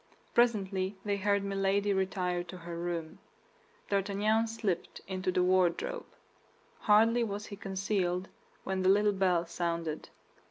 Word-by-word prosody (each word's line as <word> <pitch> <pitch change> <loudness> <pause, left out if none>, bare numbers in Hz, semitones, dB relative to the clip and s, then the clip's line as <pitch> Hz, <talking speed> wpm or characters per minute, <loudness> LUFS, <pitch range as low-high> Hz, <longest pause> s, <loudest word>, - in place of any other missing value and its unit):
Presently 195 -5 +2
they 205 -1 0
heard 200 0 +1
Milady 200 +1 +1
retire 185 -2 0
to 180 +1 -9
her 170 -1 -7
room. 170 -2 -4 0.7
D'Artagnan 205 +3 +2
slipped 215 -6 -3
into 185 0 -1
the 180 0 +2
wardrobe. 185 - +1 0.7
Hardly 225 +3 +4
was 205 -1 -4
he 205 - -7
concealed 190 -2 -1 0.4
when 190 0 -2
the 185 - +3
little 205 +1 +4
bell 180 -3 +2
sounded. 170 -2 -3
195 Hz, 125 wpm, -31 LUFS, 180-205 Hz, 0.7 s, Hardly